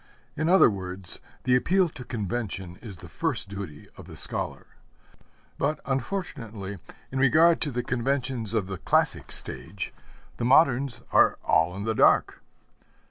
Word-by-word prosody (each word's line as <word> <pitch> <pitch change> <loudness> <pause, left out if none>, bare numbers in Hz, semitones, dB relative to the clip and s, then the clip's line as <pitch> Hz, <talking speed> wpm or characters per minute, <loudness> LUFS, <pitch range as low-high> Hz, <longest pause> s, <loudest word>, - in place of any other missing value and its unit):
In 160 - 0
other 190 +2 +7
words, 95 -2 -5 0.2
the 125 0 +3
appeal 180 +9 +3
to 130 - -10
convention 100 -5 -4
is 100 -6 -9
the 85 - -11
first 115 - -2
duty 95 -7 -7
of - - -11
the - - -10
scholar. - - -1 0.9
But, 150 +2 0
unfortunately, 120 - -4 0.3
in 135 - -2
regard 160 +5 +5
to 145 - 0
the 125 0 -2
conventions 125 -3 -1
of 105 -4 +1
the 95 -2 -6
Classic - - +1
Stage, 80 +10 -3 0.4
the - - -3
moderns 135 -2 +4
are - - +5
all 80 +2 +2
in 100 - -5
the 110 +1 0
dark. - - +3
120 Hz, 145 wpm, -26 LUFS, 95-135 Hz, 0.9 s, other